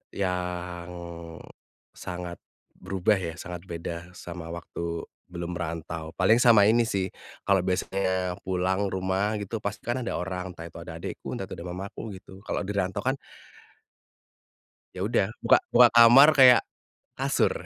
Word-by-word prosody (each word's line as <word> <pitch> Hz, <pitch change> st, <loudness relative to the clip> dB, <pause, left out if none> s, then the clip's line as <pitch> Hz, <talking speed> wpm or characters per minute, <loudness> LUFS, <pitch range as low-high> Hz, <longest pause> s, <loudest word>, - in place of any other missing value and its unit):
yang, 90 Hz, -2 st, -3 dB, 1.0 s
sangat 90 Hz, -1 st, -7 dB, 0.4 s
berubah 95 Hz, +2 st, +1 dB
ya, 85 Hz, -3 st, -4 dB
sangat 90 Hz, +1 st, -8 dB
beda 85 Hz, +1 st, -6 dB
sama 85 Hz, -2 st, -8 dB
waktu 85 Hz, 0 st, -5 dB, 0.2 s
belum 85 Hz, 0 st, -5 dB
merantau. 80 Hz, -1 st, -5 dB
Paling 110 Hz, +6 st, +4 dB
sama 115 Hz, -5 st, +7 dB
ini 115 Hz, +1 st, +3 dB
sih, 95 Hz, -3 st, -1 dB, 0.3 s
kalau 100 Hz, -1 st, +3 dB
biasanya 95 Hz, 0 st, -1 dB
pulang 95 Hz, +2 st, 0 dB
rumah 95 Hz, +3 st, -1 dB
gitu, 105 Hz, +2 st, -4 dB
pasti 100 Hz, 0 st, -5 dB
kan 120 Hz, +2 st, -1 dB
ada -, -, -3 dB
orang 90 Hz, 0 st, -4 dB
entah 80 Hz, -, -8 dB
itu 85 Hz, -, -13 dB
ada 85 Hz, -1 st, -8 dB
adekku, 95 Hz, -, -7 dB
entah 120 Hz, -, -4 dB
itu -, -, -6 dB
ada 85 Hz, -, -7 dB
mamaku, 95 Hz, +3 st, -6 dB, 0.2 s
gitu. 95 Hz, 0 st, -14 dB
Kalau -, -, -2 dB
dirantau 95 Hz, -1 st, -2 dB
kan 130 Hz, +2 st, +1 dB, 1.8 s
ya 90 Hz, -, -7 dB
udah, 100 Hz, -, +2 dB, 0.2 s
buka -, -, +6 dB, 0.2 s
buka 120 Hz, 0 st, +8 dB
kamar 120 Hz, +5 st, +9 dB
kayak 125 Hz, -2 st, +9 dB, 0.6 s
kasur. -, -, +2 dB
95 Hz, 145 wpm, -27 LUFS, 85-100 Hz, 1.8 s, kamar